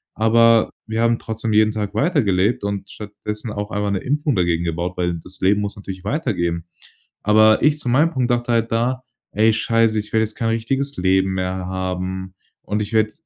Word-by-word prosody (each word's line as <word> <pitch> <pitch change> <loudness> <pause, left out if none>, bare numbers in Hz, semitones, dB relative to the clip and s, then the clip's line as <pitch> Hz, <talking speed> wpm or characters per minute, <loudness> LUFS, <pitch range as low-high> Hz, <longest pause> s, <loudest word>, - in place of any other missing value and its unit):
Aber, 115 +1 +4 0.2
wir 110 +1 -1
haben 115 0 +2
trotzdem 110 0 -3
jeden 110 0 +5
Tag 105 -2 -4
weitergelebt 110 - +1
und 100 -1 -4
stattdessen 105 +1 -7
auch 105 0 -4
einmal 105 0 -1
'ne 100 - 0
Impfung 145 +2 0
dagegen 85 -2 +1
gebaut. 85 +2 -3
Weil 90 -1 0
das 95 +4 -13
Leben 100 +2 +2
muss 100 +1 -4
natürlich 95 -3 -8
weitergehen. 95 - -1 0.6
Aber 110 +1 +5
ich 150 0 +4
zu 125 - -3
meinem 145 +7 +4
Punkt 130 -4 0
dachte 120 0 0
halt 115 -1 +1
da: 125 +3 0 0.3
„Ey 110 +1 +3
scheiße, 115 0 +2
ich 105 - -7
werde 110 0 +3
jetzt 110 0 -10
kein 115 -2 -1
richtiges 135 +5 -1
Leben 95 +1 +2
mehr 90 0 -1
haben, 95 0 -4 0.3
und 105 +1 -2
ich 105 - -4
werde 110 -1 +2
105 Hz, 190 wpm, -20 LUFS, 95-115 Hz, 0.6 s, jeden